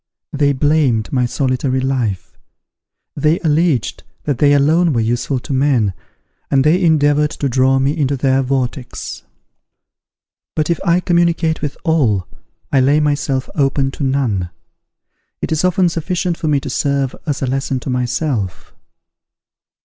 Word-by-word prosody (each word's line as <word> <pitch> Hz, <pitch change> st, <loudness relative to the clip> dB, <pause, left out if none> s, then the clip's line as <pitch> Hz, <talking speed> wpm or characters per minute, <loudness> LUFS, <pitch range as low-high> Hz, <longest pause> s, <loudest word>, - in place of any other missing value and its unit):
They 145 Hz, -1 st, +2 dB
blamed 140 Hz, -5 st, +1 dB
my 125 Hz, -2 st, +2 dB
solitary 130 Hz, 0 st, -1 dB
life; 130 Hz, -8 st, -2 dB, 0.8 s
they 155 Hz, +4 st, +1 dB
alleged 155 Hz, -, +1 dB, 0.2 s
that 140 Hz, -5 st, -2 dB
they 145 Hz, -1 st, +5 dB
alone 155 Hz, +4 st, +3 dB
were 120 Hz, -, +1 dB
useful 120 Hz, +4 st, -1 dB
to 140 Hz, -, -5 dB
men, 130 Hz, -7 st, +2 dB, 0.6 s
and 135 Hz, -1 st, +3 dB
they 170 Hz, +6 st, +3 dB
endeavoured 150 Hz, -2 st, +3 dB
to 145 Hz, -, -3 dB
draw 130 Hz, +1 st, +2 dB
me 135 Hz, +3 st, +1 dB
into 140 Hz, -3 st, 0 dB
their 135 Hz, 0 st, +2 dB
vortex. 130 Hz, -1 st, -3 dB, 1.3 s
But 155 Hz, +1 st, 0 dB
if 170 Hz, -, 0 dB
I 175 Hz, +1 st, +2 dB
communicate 170 Hz, -2 st, +1 dB
with 145 Hz, -1 st, -4 dB
all, 120 Hz, -, +1 dB, 0.4 s
I 135 Hz, -, +4 dB
lay 140 Hz, +4 st, +3 dB
myself 145 Hz, -3 st, 0 dB
open 135 Hz, -1 st, +1 dB
to 140 Hz, -, -6 dB
none. 125 Hz, -10 st, 0 dB, 0.9 s
It -, -, -4 dB
is 160 Hz, +1 st, 0 dB
often 180 Hz, 0 st, +3 dB
sufficient 175 Hz, +1 st, -2 dB
for 160 Hz, -, -4 dB
me 145 Hz, -2 st, +2 dB
to 140 Hz, -, -6 dB
serve 140 Hz, -1 st, 0 dB
as 145 Hz, -2 st, -2 dB
a -, -, +2 dB
lesson 135 Hz, 0 st, -1 dB
to 130 Hz, -, -4 dB
myself. 125 Hz, -, -2 dB
140 Hz, 145 wpm, -17 LUFS, 130-155 Hz, 1.3 s, they